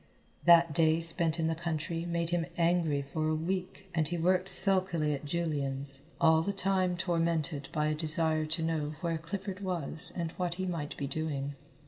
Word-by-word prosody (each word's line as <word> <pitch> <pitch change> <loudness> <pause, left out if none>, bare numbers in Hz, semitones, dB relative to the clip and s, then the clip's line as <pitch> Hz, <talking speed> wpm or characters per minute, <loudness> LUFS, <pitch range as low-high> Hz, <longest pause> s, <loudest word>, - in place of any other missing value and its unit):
That 170 -2 +6
day 160 +1 +2
spent 165 0 -1
in 160 - 0
the 160 - 0
country 165 0 -4
made 170 -1 -2
him 175 -1 -1
angry 165 -4 +1
for 155 +3 -3
a 155 - 0
week, 185 +4 -4
and 160 -3 0
he 175 +2 -3
worked 185 +2 +1
sulkily 185 -6 +7
at 145 +1 -6
Julian's, 140 -4 -3
all 160 -1 +4
the 200 - -2
time 190 -2 0
tormented 165 -4 -2
by 150 -1 -1
a 155 - 0
desire 155 0 0
to 160 +1 -1
know 155 -2 -2
where 165 -2 -2
Clifford 190 +3 -6
was 180 -3 -3
and 170 -2 -3
what 175 -2 -2
he 185 +1 -4
might 165 -5 -5
be 140 - -3
doing. 145 -1 -4
165 Hz, 180 wpm, -30 LUFS, 155-175 Hz, -, sulkily